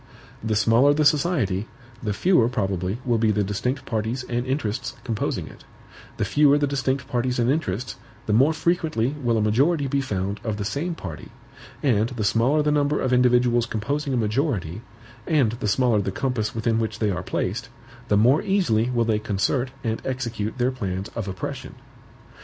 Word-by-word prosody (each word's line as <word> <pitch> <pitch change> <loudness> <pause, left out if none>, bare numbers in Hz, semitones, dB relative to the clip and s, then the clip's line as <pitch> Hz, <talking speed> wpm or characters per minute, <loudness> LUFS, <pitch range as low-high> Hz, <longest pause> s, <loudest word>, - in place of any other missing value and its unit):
The 110 -1 0
smaller 115 +7 +4
the 155 0 +2
society, 140 - +2 0.3
the 110 - -2
fewer 120 - +3
probably 95 -3 -1
will 120 -3 +2
be 110 0 +2
the 105 -1 +2
distinct 125 +7 -2
parties 115 +3 -2
and 120 +1 -2
interests 130 -5 -2
composing 115 -4 -2
it; - - -14 0.5
the - - 0
fewer 145 -1 +4
the 145 - +2
distinct 135 -1 -1
parties 125 +1 -1
and 120 +1 +2
interests, 125 - -2 0.3
the 105 - 0
more 135 +8 +5
frequently 160 -7 0
will 120 -3 +1
a - - +1
majority 140 +8 +2
be 140 +1 0
found 100 -5 -3
of 110 -3 -2
the 100 - -3
same 155 - -2
party; 80 - -8 0.5
and 115 -5 +2
the 120 -4 -4
smaller 115 +9 +2
the 150 - +2
number 145 0 +1
of 130 - 0
individuals 125 -1 +3
composing 140 +7 -2
a 130 - +1
majority, 110 - -1 0.5
and 140 -9 +3
the - - -2
smaller 115 0 +2
the 95 - -2
compass 120 -2 -2
within 115 0 +1
which 110 -1 -2
they 105 -2 0
are 90 -1 -2
placed, - - -3 0.4
the 105 - +3
more 125 +8 +4
easily 125 - +1
will 120 -2 +1
they 110 -2 +1
concert 105 +6 0
and 115 -2 -2
execute 120 -4 -3
their 125 +1 +1
plans 100 -6 -4
of 115 -4 -5
oppression. 95 -1 -6
120 Hz, 180 wpm, -24 LUFS, 105-135 Hz, 0.5 s, more